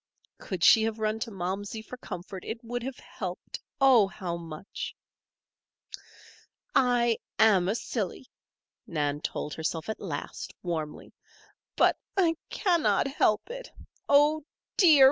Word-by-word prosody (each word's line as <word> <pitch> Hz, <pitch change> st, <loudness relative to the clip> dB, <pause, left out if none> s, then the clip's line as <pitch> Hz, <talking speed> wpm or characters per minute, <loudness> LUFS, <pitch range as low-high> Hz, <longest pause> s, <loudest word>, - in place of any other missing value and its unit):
Could 185 Hz, -3 st, -4 dB
she 220 Hz, -, +8 dB
have 220 Hz, 0 st, 0 dB
run 215 Hz, 0 st, 0 dB
to 230 Hz, -, -3 dB
Momsey 200 Hz, +3 st, -4 dB
for 250 Hz, -, -8 dB
comfort 185 Hz, -5 st, -7 dB
it 230 Hz, +2 st, -5 dB
would 245 Hz, +1 st, -3 dB
have 260 Hz, +1 st, -5 dB
helped, 180 Hz, -3 st, -6 dB, 0.2 s
Oh, 255 Hz, -7 st, +6 dB
how 180 Hz, -2 st, -4 dB
much! 165 Hz, +1 st, -7 dB, 1.8 s
"I 245 Hz, -3 st, +3 dB, 0.2 s
am 200 Hz, -5 st, +5 dB
a 210 Hz, -, +1 dB
silly," 225 Hz, -1 st, -3 dB, 0.6 s
Nan 145 Hz, -2 st, -1 dB
told 150 Hz, -, -3 dB
herself 160 Hz, +2 st, -3 dB
at 220 Hz, -, -3 dB
last, 160 Hz, -8 st, -5 dB
warmly. 160 Hz, -4 st, -4 dB, 0.6 s
"But -, -, +4 dB, 0.2 s
I 340 Hz, -4 st, +4 dB
cannot 345 Hz, -7 st, +2 dB
help 270 Hz, -, +1 dB
it. -, -, -7 dB, 0.4 s
Oh, 295 Hz, +2 st, +5 dB, 0.3 s
dear! 325 Hz, -7 st, +7 dB
220 Hz, 125 wpm, -28 LUFS, 175-250 Hz, 1.8 s, she